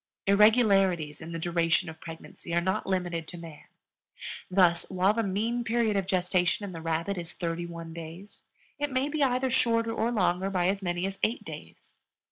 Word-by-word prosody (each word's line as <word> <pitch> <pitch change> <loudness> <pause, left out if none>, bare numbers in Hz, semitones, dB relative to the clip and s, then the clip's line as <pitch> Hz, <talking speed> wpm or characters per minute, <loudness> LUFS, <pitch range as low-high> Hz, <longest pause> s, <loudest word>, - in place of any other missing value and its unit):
Irregularities 195 - +4
in 160 +1 -7
the 165 - -3
duration 170 +1 +1
of 160 0 -9
pregnancy 165 +1 -7
are - - +4
not 185 +2 -1
limited 175 -4 -1
to 175 - -7
man. 165 -3 -11 0.8
Thus, 180 -2 +4
while 190 +2 +3
the 230 - 0
mean 225 +4 -1
period 230 -2 +1
of 195 -2 0
gestation 180 +1 +1
in 195 - -6
the 165 -2 -7
rabbit 165 +4 -1
is 170 -1 -7
thirty 170 0 -3
one 165 -1 -8
days, 170 +5 -10 0.4
it 290 -1 -1
may 260 +2 0
be 305 0 -2
either 260 -1 +2
shorter 230 -2 +2
or 230 +1 0
longer 190 -3 +1
by 180 -2 +1
as 195 +1 -1
many 175 -1 -1
as 195 0 -4
eight 230 +4 0
days. - - -11
185 Hz, 185 wpm, -28 LUFS, 170-215 Hz, 0.8 s, Irregularities